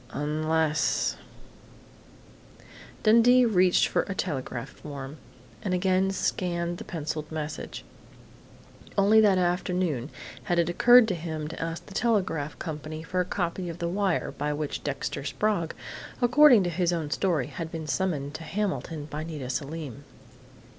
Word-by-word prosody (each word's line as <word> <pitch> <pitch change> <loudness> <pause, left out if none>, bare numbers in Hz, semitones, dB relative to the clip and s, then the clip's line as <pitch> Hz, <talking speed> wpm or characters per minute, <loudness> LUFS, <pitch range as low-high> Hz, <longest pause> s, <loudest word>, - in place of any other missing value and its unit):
Unless 155 +1 +1 0.9
" - - -21
Dundee 235 +3 +6
reached 185 -5 +4
for - - +1
a 195 - -2
telegraph 130 -7 -3
form 140 0 -8 0.4
and 185 - -1
again 185 +1 +2
scanned 175 -2 -1
the - - -6
pencilled 155 -2 -5
message. 155 0 -5 1.1
Only 210 +2 +6
that 200 -3 +5
afternoon 175 -6 0 0.4
had 175 -4 0
it 170 0 +2
occurred 240 +6 +7
to - - +1
him 160 -3 -4
to 160 - -7
ask 165 0 -4
the 200 - -12
telegraph 190 -11 0
company 155 -1 -6
for 185 +3 -2
a 180 - +2
copy 180 -1 -2
of 165 - -6
the 170 -1 -2
wire 190 0 0
by 150 0 -2
which 150 0 -4
Dexter 140 0 -3
Sprague, 170 +2 -1 0.4
according 245 -2 +6
to 175 - -1
his 175 +1 +1
own 160 -4 -2
story, 165 -9 +1
had 165 +4 -6
been 160 -2 -5
summoned 150 -4 -1
to 160 - -7
Hamilton 170 -5 -3
by 150 +1 -5
Nita 150 -6 -5
Selim. 140 -1 -5
170 Hz, 145 wpm, -27 LUFS, 155-190 Hz, 1.1 s, occurred